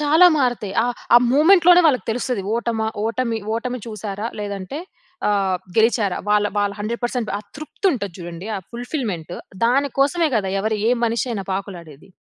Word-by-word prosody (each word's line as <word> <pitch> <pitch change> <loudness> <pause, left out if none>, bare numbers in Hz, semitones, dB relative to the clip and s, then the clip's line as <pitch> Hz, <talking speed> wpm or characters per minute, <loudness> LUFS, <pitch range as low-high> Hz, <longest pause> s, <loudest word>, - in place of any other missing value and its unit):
చాలా 310 +4 +6
మారుతాయి. 245 -7 0
ఆహ్, 245 +1 -1 0.2
ఆ - - +11
మూవ్‌మెంట్‌లోనే 350 +5 +6
వాళ్ళకి 270 -5 +2
తెలుస్తది. 240 -2 -2
ఓటమా, 230 -1 -1 0.2
ఓటమి 230 0 -1 0.2
ఓటమి 250 +2 -3
చూసారా, 215 -1 -5
లేదంటే 200 +5 -5 0.5
ఆహ్, 195 -3 +1 0.2
గెలిచారా? 220 -4 +3
వాళ్ళ 210 0 +3
వాళ్ళ 205 -1 +1
100% 235 +2 -2
ఆ - - -3 0.2
తృప్తి 310 +6 -4
ఉంటది 205 - -4
చూడండి, 175 +1 -8
ఆ - - -3
ఫుల్‌ఫిల్‌మెంట్ 235 - -4 0.3
దాని 270 +4 +3
కోసమే 320 +4 +3
కదా! 200 -3 -1
ఎవరు, 220 +2 0
ఏ - - +4
మనిషి 230 +2 0
అయినా 205 -4 -3
పాకులాడేది. 175 -6 -7
225 Hz, 150 wpm, -21 LUFS, 200-255 Hz, 0.5 s, ఆ